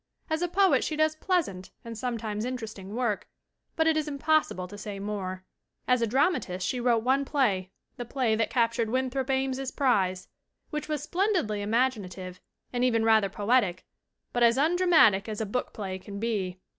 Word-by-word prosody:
As 315 Hz, +1 st, 0 dB
a 355 Hz, -, +1 dB
poet 385 Hz, +2 st, +3 dB
she 310 Hz, -, -2 dB
does 310 Hz, 0 st, +2 dB
pleasant 310 Hz, -, -1 dB, 0.2 s
and 230 Hz, 0 st, -6 dB
sometimes 220 Hz, -3 st, -3 dB
interesting 220 Hz, -5 st, -6 dB
work, 235 Hz, -5 st, -1 dB, 0.5 s
but 320 Hz, -, +2 dB
it 320 Hz, -1 st, +3 dB
is 310 Hz, -1 st, 0 dB
impossible 290 Hz, -, +1 dB
to 205 Hz, -, -10 dB
say 205 Hz, -1 st, -6 dB
more. 190 Hz, -2 st, -4 dB, 0.4 s
As 250 Hz, -1 st, +3 dB
a 230 Hz, -, +2 dB
dramatist 225 Hz, -, +1 dB
she 250 Hz, -, -1 dB
wrote 235 Hz, -2 st, +2 dB
one 265 Hz, +3 st, +2 dB
play 235 Hz, -10 st, 0 dB, 0.3 s
the 245 Hz, -, -4 dB
play 240 Hz, -1 st, 0 dB
that 220 Hz, 0 st, +1 dB
captured 230 Hz, -2 st, +1 dB
Winthrop 260 Hz, +2 st, -1 dB
Ames's 265 Hz, 0 st, 0 dB
prize 195 Hz, -10 st, +1 dB, 0.4 s
which 300 Hz, 0 st, -4 dB
was 300 Hz, -2 st, -2 dB
splendidly 345 Hz, -, 0 dB
imaginative 205 Hz, -5 st, -1 dB, 0.3 s
and 245 Hz, 0 st, 0 dB
even 230 Hz, -3 st, +2 dB
rather 220 Hz, -3 st, +4 dB
poetic, 205 Hz, -3 st, +1 dB, 0.5 s
but 245 Hz, -, 0 dB
as 235 Hz, +1 st, +5 dB
undramatic 315 Hz, -, +4 dB
as 215 Hz, -, -4 dB
a 220 Hz, -, -1 dB
"book 250 Hz, +5 st, -3 dB
play" 190 Hz, -4 st, -5 dB
can 200 Hz, +1 st, -8 dB
be. 200 Hz, -5 st, -2 dB
235 Hz, 170 wpm, -28 LUFS, 205-270 Hz, 0.5 s, as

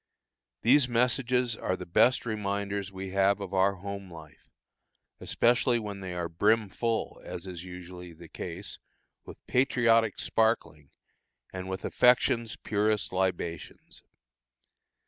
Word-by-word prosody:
These 130 Hz, +3 st, +5 dB
messages 125 Hz, 0 st, +1 dB
are 95 Hz, -, -2 dB
the 90 Hz, -, -7 dB
best 120 Hz, +10 st, +3 dB
reminders 100 Hz, -2 st, -3 dB
we 95 Hz, 0 st, -6 dB
have 100 Hz, +1 st, +3 dB
of 100 Hz, -1 st, -6 dB
our 95 Hz, +1 st, +3 dB
home 100 Hz, 0 st, -7 dB
life, 80 Hz, -1 st, -14 dB, 0.7 s
especially 120 Hz, +1 st, +2 dB
when 105 Hz, -3 st, -5 dB
they 95 Hz, -2 st, -6 dB
are 85 Hz, -1 st, -2 dB
brim 105 Hz, +5 st, +2 dB
full, 115 Hz, +3 st, -2 dB
as 90 Hz, 0 st, -7 dB
is 90 Hz, -2 st, -7 dB
usually 90 Hz, -1 st, -9 dB
the 85 Hz, +1 st, -13 dB
case, 90 Hz, +4 st, -7 dB, 0.5 s
with -, -, -13 dB
patriotic 115 Hz, -4 st, +3 dB
sparkling, 110 Hz, -10 st, 0 dB, 0.6 s
and 95 Hz, 0 st, -6 dB
with 95 Hz, 0 st, -4 dB
affection's 120 Hz, -2 st, +3 dB
purest 105 Hz, -1 st, -1 dB
libations. 90 Hz, -3 st, -3 dB
100 Hz, 125 wpm, -29 LUFS, 90-115 Hz, 0.7 s, These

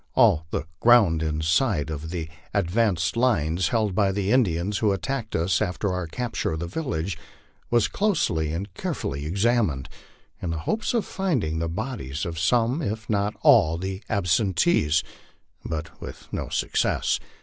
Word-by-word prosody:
All 80 Hz, 0 st, +4 dB
the -, -, -2 dB, 0.2 s
ground 105 Hz, -9 st, +5 dB
inside 80 Hz, -, +1 dB
of 80 Hz, +1 st, -5 dB
the 85 Hz, -2 st, -4 dB, 0.3 s
advanced 90 Hz, -2 st, +1 dB
lines 90 Hz, -9 st, +2 dB
held 110 Hz, 0 st, +1 dB
by 100 Hz, 0 st, +2 dB
the 100 Hz, +1 st, -1 dB
In 130 Hz, +1 st, +6 dB
dians 90 Hz, +2 st, -1 dB
who 105 Hz, -2 st, +2 dB
attacked 110 Hz, +4 st, -3 dB
us 85 Hz, +3 st, +1 dB
after 100 Hz, -1 st, -1 dB
our 90 Hz, -2 st, -3 dB
capture 120 Hz, -2 st, -2 dB
of 80 Hz, -, -3 dB
the 85 Hz, -, -3 dB
village 85 Hz, -, -3 dB, 0.5 s
was 120 Hz, -3 st, +3 dB
closely 120 Hz, -, 0 dB
and 90 Hz, +4 st, -4 dB
care -, -, -3 dB
fully 70 Hz, +2 st, -4 dB
examined, 100 Hz, -, +1 dB, 0.5 s
in 90 Hz, -, -3 dB
the 80 Hz, -, -2 dB
hope 220 Hz, -, 0 dB
of 230 Hz, -, +1 dB
finding 130 Hz, -, -1 dB
the 85 Hz, 0 st, -1 dB
bodies 85 Hz, -, -4 dB
of 85 Hz, -2 st, -4 dB
some 120 Hz, -, +2 dB
if 110 Hz, -3 st, -3 dB
not 105 Hz, 0 st, 0 dB
all 80 Hz, +1 st, +6 dB
the 95 Hz, +2 st, -4 dB
absen 100 Hz, -1 st, +1 dB
tees, 80 Hz, -, +3 dB, 0.6 s
but 80 Hz, 0 st, -5 dB
with -, -, -9 dB
no -, -, -3 dB
success. -, -, 0 dB
95 Hz, 160 wpm, -25 LUFS, 80-115 Hz, 0.6 s, In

